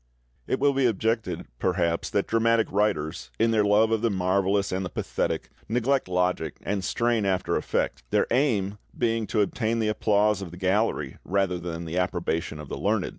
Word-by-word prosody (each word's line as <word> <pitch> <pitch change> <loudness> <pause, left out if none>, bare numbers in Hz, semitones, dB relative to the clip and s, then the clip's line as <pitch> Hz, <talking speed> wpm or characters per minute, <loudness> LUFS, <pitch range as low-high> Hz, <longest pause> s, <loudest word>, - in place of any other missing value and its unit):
It 130 - 0
will, 140 +1 +3
be 135 -2 +3
objected, 110 +1 -1
perhaps, 85 -2 0
that 100 - 0
dramatic 115 0 +2
writers, 80 - 0
in 115 +1 +3
their 110 -2 +3
love 105 +2 +4
of 110 -1 +1
the 115 - +2
marvellous 100 +1 +1
and 95 +1 -1
the 90 - -4
pathetic, - - -2 0.2
neglect 125 +3 +1
logic 90 -4 0
and 100 -2 -2
strain 115 +2 +1
after 95 -2 0
effect, - - -1
their - - +2
aim 105 -6 +1 0.2
being 115 -2 0
to 110 - +1
obtain 110 +2 0
the 110 -2 +1
applause 105 -1 +2
of 95 - -6
the 90 - -11
gallery 95 +5 0
rather 95 -1 0
than 85 0 -5
the 85 +3 -2
approbation 85 -3 -2
of 75 - -8
the - - -5
learned. - - +1
100 Hz, 180 wpm, -26 LUFS, 90-115 Hz, 0.2 s, love